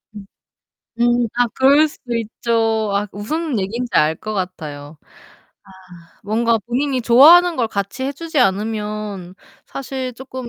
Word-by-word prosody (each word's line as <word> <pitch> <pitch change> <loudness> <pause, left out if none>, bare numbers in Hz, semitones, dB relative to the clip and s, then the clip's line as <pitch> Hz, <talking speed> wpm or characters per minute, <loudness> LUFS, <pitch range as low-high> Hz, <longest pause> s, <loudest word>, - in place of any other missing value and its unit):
음 205 -1 -9 0.7
음. 240 0 +2
아 245 0 +3
그럴 280 +4 +5
수도 245 -5 -7
있죠. 225 -1 -1
아 205 +1 -1
무슨 280 +5 -3
얘기인지 235 +6 -3
알 155 +1 +3
것 215 +6 -6
같아요. 155 -6 -6 1.0
아 170 0 -26
뭔가 230 +2 +1
본인이 260 +2 -1
좋아하는 325 +9 +6
걸 235 -3 0
같이 200 +4 -4
해 275 - -2
주지 320 +1 -4
않으면 210 -3 -2 0.3
사실 265 -1 -5
쪼끔 260 0 -8
230 Hz, 250 characters per minute, -19 LUFS, 205-260 Hz, 1.0 s, 좋아하는